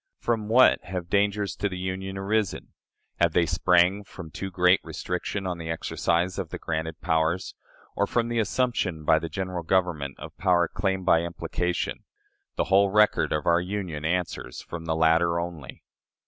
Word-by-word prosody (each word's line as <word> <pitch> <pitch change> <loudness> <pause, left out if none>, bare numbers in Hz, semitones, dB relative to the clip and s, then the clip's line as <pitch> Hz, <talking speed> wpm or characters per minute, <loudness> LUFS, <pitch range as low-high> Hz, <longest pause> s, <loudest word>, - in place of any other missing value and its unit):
From 115 -3 -1
what 125 +4 +5
have 90 -1 -5
dangers 100 0 +1
to 100 - -1
the 95 - -6
Union 95 +1 -4
arisen? 100 0 -1 0.5
Have 85 -2 +3
they 85 - +3
sprang 90 +3 +3
from 85 -5 -10
too 95 - -5
great 90 0 +4
restriction 90 +2 -4
on 90 -2 -3
the 80 -1 -6
exercise 85 +2 -1
of 90 -4 -4
the - - -5
granted 80 +1 -4
powers, 80 +2 0 0.4
or - - +1
from 120 -1 0
the 120 0 -1
assumption 105 -8 -1
by 80 - +5
the 80 0 -5
General 90 +2 -3
Government 80 -6 0
of - - -10
power 90 -3 +3
claimed 95 -1 -2
by 85 -3 +5
implication? 85 +1 -3 0.5
The - - +1
whole 100 +1 +6
record 105 +2 +3
of 75 -1 -1
our 85 +1 +4
Union 90 -5 -4
answers, 90 +2 -2
from 85 -1 -8
the 80 -1 0
latter 85 +1 +3
only. 85 -5 -7
90 Hz, 170 wpm, -26 LUFS, 85-95 Hz, 0.5 s, whole